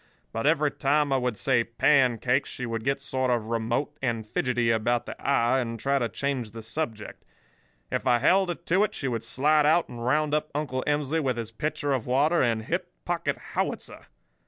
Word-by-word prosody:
But 115 +5 -1
every 150 -2 +3
time 145 +1 +1
I - - +3
would 125 -4 -1
say 125 -1 +2
'pancakes' 125 +1 +2
she 125 - -5
would 115 -1 -3
get 135 +2 0
sort 130 -2 -1
of 115 -3 0
remote 120 +6 -1
and 115 -4 -1
fidgety 120 +1 0
about 120 +2 +1
the - - -6
eye, 130 -2 +2
and 115 -2 -3
try 140 +3 +1
to 120 -2 -1
change 130 +1 -2
the 115 +1 -9
subject. 110 -3 -5 0.7
If - - -2
I 120 -1 +5
held 185 +9 +3
her 175 - -1
to 180 +4 +1
it 210 - -2
she 135 - -3
would 115 -3 -2
slide 150 +2 +3
out 165 +2 +3
and 120 -1 -7
round 150 +4 +1
up 155 0 0
Uncle 130 -4 -2
Emsley 150 +1 +1
with 130 -4 -1
his 115 -1 -5
pitcher 145 +3 -2
of 125 -4 -2
water 145 +7 +3
and 115 -3 +1
hip - - -3
pocket - - -1 0.2
howitzer. - - -3
130 Hz, 200 wpm, -26 LUFS, 115-150 Hz, 0.7 s, I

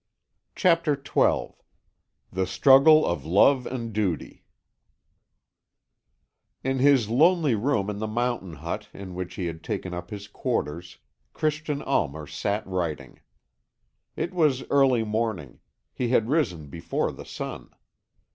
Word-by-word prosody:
CHAPTER 170 -5 +3
XII 140 +1 0 0.8
THE 95 0 -1
STRUGGLE 140 +8 +6
OF 85 - -2
LOVE 125 - +4
AND 115 -3 -5
DUTY 100 -7 -2 2.2
In 135 0 -1
his 135 -4 +4
lonely 155 +3 +4
room 110 -2 0
in 105 -1 -4
the 110 - -2
mountain 115 -5 -2
hut 80 +3 -6
in 95 -2 -8
which 90 0 -6
he 90 - -3
had 80 -1 -6
taken 95 -4 -4
up 90 0 -6
his 100 -1 -7
quarters, 85 -3 -3 0.4
Christian 155 -1 -2
Almer 75 -1 -1
sat 100 +8 -3
writing. 90 -5 -4 1.0
It 170 +3 -3
was 150 -7 +1
early 135 -4 +4
morning; 110 - -3 0.3
he 125 - -2
had 115 -2 +2
risen 110 - 0
before 80 +4 -3
the - - -10
sun. - - -7
110 Hz, 125 wpm, -25 LUFS, 90-140 Hz, 2.2 s, STRUGGLE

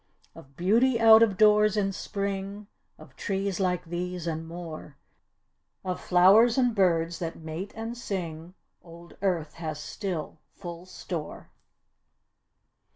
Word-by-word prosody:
Of 135 0 -16
beauty 230 +7 +3
out 225 -1 +8
of 210 -5 +3
doors 210 0 +5
in 195 -1 +1
Spring, 200 +1 -4 0.3
of 155 -3 -16
trees 195 -1 -2
like 180 -2 0
these, 175 +1 -4
and 160 -1 -3
more, 165 -4 -9 0.9
Of 180 -1 -3
flowers 200 +7 +5
and 245 -2 +3
birds 170 -4 +1
that 165 -1 -4
mate 160 +5 -7
and 225 +1 -5
sing, 175 -6 -5 0.3
old 170 0 -14
Earth 175 -6 -1
has 155 -2 -4
still 175 -1 -5 0.2
full 175 0 -9
store. 170 -4 -7
180 Hz, 125 wpm, -27 LUFS, 165-205 Hz, 0.9 s, out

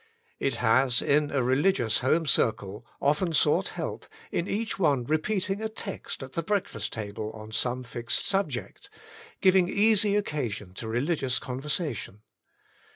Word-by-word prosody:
It 135 -3 0
has, 125 +2 +3
in 145 +1 +3
a 135 -3 0
religious 130 - +2
home 155 +6 +2
circle, 105 -5 +1 0.2
often 155 +5 +1
sought 150 -1 +3
help, - - -4 0.2
in 170 - -1
each 215 -1 -2
one 145 -8 +3
repeating 195 - -1
a 220 - -2
text 200 -9 -6
at 130 - -10
the 165 - -1
breakfast 185 - -2
table 105 0 -4
on 110 0 -10
some 125 +3 -1
fixed 120 -1 -2
subject, 170 -11 -2 0.5
giving 185 -1 +5
easy 205 0 +4
occasion 120 - -2
to 110 +4 -6
religious 130 +2 0
conversation. 130 - -3
140 Hz, 140 wpm, -27 LUFS, 120-185 Hz, 0.5 s, giving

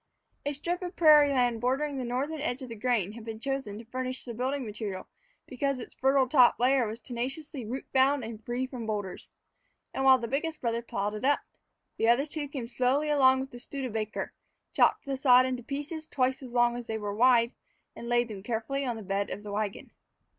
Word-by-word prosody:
A 290 - 0
strip 345 +6 -3
of 360 0 -5
prairie 300 -3 +7
land 245 -4 +1
bordering 270 +3 0
the - - -2
northern 275 +6 -2
edge 265 -2 -2
of 255 - -8
the 230 - -6
grain 215 -4 0
had 225 +1 -10
been 220 -1 -6
chosen 265 -5 -3
to 230 - -10
furnish 255 +2 -4
the 240 - -5
building 260 +3 -2
material 205 -3 -5 0.4
because 275 +1 -1
its 245 - -9
fertile 265 0 +3
top 250 -2 +5
layer 255 -1 +3
was 220 +2 -5
tenaciously 260 +3 -5
root 255 +4 -4
bound 265 0 +3
and 220 -1 -7
free 245 +3 -2
from 250 -4 -7
boulders. 205 -4 -4 0.6
And 270 - -1
while 265 -1 +7
the 235 -2 -4
biggest 305 +5 -2
brother 235 -1 -1
plowed 205 -3 -3
it 215 - -6
up, 285 +2 +3 0.6
the 225 - +1
other 250 +4 +4
two 300 -1 -5
came 270 -4 -5
slowly 265 +5 +1
along 265 -2 +5
with 265 - -6
the 245 - -9
Studebaker, 235 -5 -4 0.4
chopped - - +3
the 275 -1 -2
sods 255 -1 +6
into 255 -1 -3
pieces 295 +5 -5
twice 260 -1 0
as 255 -2 -9
long 240 0 +3
as 240 -1 -7
they 220 - -2
were 205 -1 -4
wide, 235 +1 +4 0.4
and 235 - -7
laid 240 0 +3
them 205 -4 -7
carefully 235 +6 -2
on 245 -3 -2
the 220 - -7
bed 195 +1 -1
of 205 - -6
the 205 - -7
wagon. 205 -1 -3
250 Hz, 210 wpm, -29 LUFS, 230-275 Hz, 0.6 s, prairie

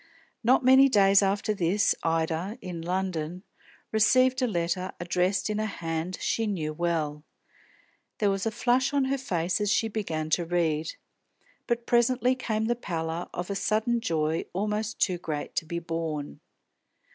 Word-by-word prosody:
Not 250 +2 +4
many 265 +1 +7
days 200 -3 +5
after 200 +2 +1
this, 195 +1 +2
Ida, 165 +5 -1
in 175 -3 -6
London, 180 -1 -3 0.5
received 255 +4 +4
a 250 - +2
letter, 180 -1 -1
addressed 180 +2 0
in 210 0 -2
a 215 - 0
hand 165 -1 -4
she 225 -1 0
knew 160 -7 -2
well. 155 -3 -1 0.9
There 205 -2 +2
was 195 +2 -1
a - - 0
flush 250 +4 +1
on 275 -2 +3
her 275 +1 0
face 180 -6 -1
as 205 - +1
she 225 - +2
began 160 -8 -3
to 175 - +2
read; 165 -2 0 0.7
but 235 -1 -1
presently 245 +1 +3
came 220 -4 -2
the 240 +1 +1
pallor 165 -6 -4
of 175 +3 -5
a - - -2
sudden 220 +4 +1
joy 160 -3 0
almost 210 +3 -2
too 180 -4 +1
great 150 -3 -4
to 165 - 0
be 170 - -3
borne. 165 -3 -4
190 Hz, 160 wpm, -27 LUFS, 165-220 Hz, 0.9 s, many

